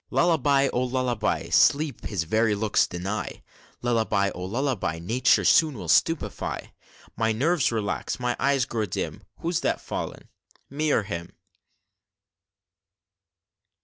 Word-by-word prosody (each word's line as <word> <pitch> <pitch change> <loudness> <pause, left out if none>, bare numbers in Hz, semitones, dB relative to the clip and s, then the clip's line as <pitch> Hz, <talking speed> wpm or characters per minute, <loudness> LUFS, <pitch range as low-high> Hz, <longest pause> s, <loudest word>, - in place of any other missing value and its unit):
"Lullaby, 145 -5 +3
oh, 125 - +1
lullaby! 125 -3 -1
Sleep 145 -3 +3
his 100 -6 -2
very 110 +5 +1
looks 105 0 +2
deny 95 +4 -5 0.4
Lullaby, 110 -4 +1
oh, 90 - -6
lullaby; 115 - -1
Nature 110 +10 +2
soon 155 -6 +4
will 90 - -7
stupefy 165 - 0 0.4
My 110 0 +1
nerves 145 +6 +1
relax, 110 0 -2
my 125 0 -1
eyes 140 -2 +2
grow 110 -4 -2
dim - - -4 0.2
Who's 170 0 0
that - - 0
fallen - - -6 0.4
me 150 +2 0
or 110 - +2
him?" 85 -4 -6
120 Hz, 120 wpm, -25 LUFS, 105-140 Hz, 0.4 s, soon